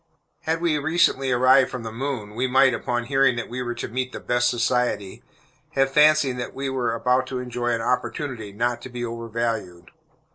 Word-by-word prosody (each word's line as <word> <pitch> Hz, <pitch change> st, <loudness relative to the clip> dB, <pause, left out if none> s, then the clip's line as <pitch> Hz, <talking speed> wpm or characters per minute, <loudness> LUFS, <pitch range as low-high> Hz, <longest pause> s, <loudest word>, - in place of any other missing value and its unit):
Had 160 Hz, +1 st, 0 dB
we 160 Hz, -3 st, +1 dB
recently 145 Hz, -3 st, +2 dB
arrived 130 Hz, +2 st, +5 dB
from 125 Hz, -3 st, -6 dB
the 110 Hz, -, -5 dB
moon, 115 Hz, -3 st, -4 dB
we 125 Hz, +4 st, -1 dB
might, 130 Hz, 0 st, +4 dB
upon 120 Hz, +1 st, -2 dB
hearing 135 Hz, 0 st, +2 dB
that 120 Hz, -, -5 dB
we 125 Hz, +2 st, -4 dB
were 120 Hz, -1 st, -3 dB
to -, -, -4 dB
meet 130 Hz, +2 st, -3 dB
the -, -, -5 dB
"best 120 Hz, 0 st, +1 dB
society," 120 Hz, -5 st, -1 dB, 0.5 s
have 135 Hz, 0 st, +2 dB
fancied 150 Hz, -3 st, +4 dB
that 125 Hz, -, -5 dB
we 135 Hz, 0 st, -3 dB
were 125 Hz, -3 st, -1 dB
about 125 Hz, +2 st, +1 dB
to 130 Hz, -, -4 dB
enjoy 125 Hz, -1 st, -4 dB
an 115 Hz, -1 st, 0 dB
opportunity 125 Hz, -2 st, -2 dB
not 120 Hz, +3 st, -1 dB
to -, -, -8 dB
be 120 Hz, -1 st, -4 dB
overvalued. 115 Hz, -6 st, -4 dB
125 Hz, 190 wpm, -23 LUFS, 120-135 Hz, 0.5 s, arrived